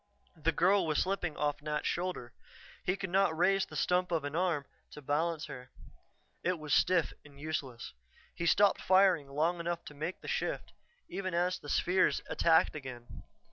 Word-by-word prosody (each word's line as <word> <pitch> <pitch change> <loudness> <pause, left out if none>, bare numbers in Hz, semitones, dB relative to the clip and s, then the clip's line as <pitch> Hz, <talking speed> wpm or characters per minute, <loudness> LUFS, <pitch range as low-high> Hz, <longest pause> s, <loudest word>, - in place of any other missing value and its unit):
The 160 0 0
girl 180 +3 +3
was 155 - 0
slipping 180 -4 -2
off 145 -1 -1
Nat's 150 0 -3
shoulder. 175 -9 -2 0.5
He 180 - +1
could 195 -2 -5
not 195 -4 +2
raise 195 +2 +3
the - - -11
stump 180 0 +1
of 165 -3 0
an 145 +1 -4
arm 170 -5 0 0.3
to - - -9
balance 155 +3 0
her; 125 0 -9 0.7
it 180 0 0
was 150 -2 -3
stiff 180 -3 +3
and 140 -1 -16
useless. 145 -5 -5 0.4
He 170 - -2
stopped 205 +3 +4
firing 185 -6 +4
long 160 +5 0
enough 170 0 -3
to - - -9
make 155 +5 -5
the - - -10
shift, 485 0 -2 0.3
even 185 -3 -4
as 180 +1 +1
the 145 - -10
spheres 185 +4 +2
attacked 160 -2 +3
again. 130 -5 -8
170 Hz, 175 wpm, -32 LUFS, 150-185 Hz, 0.7 s, stopped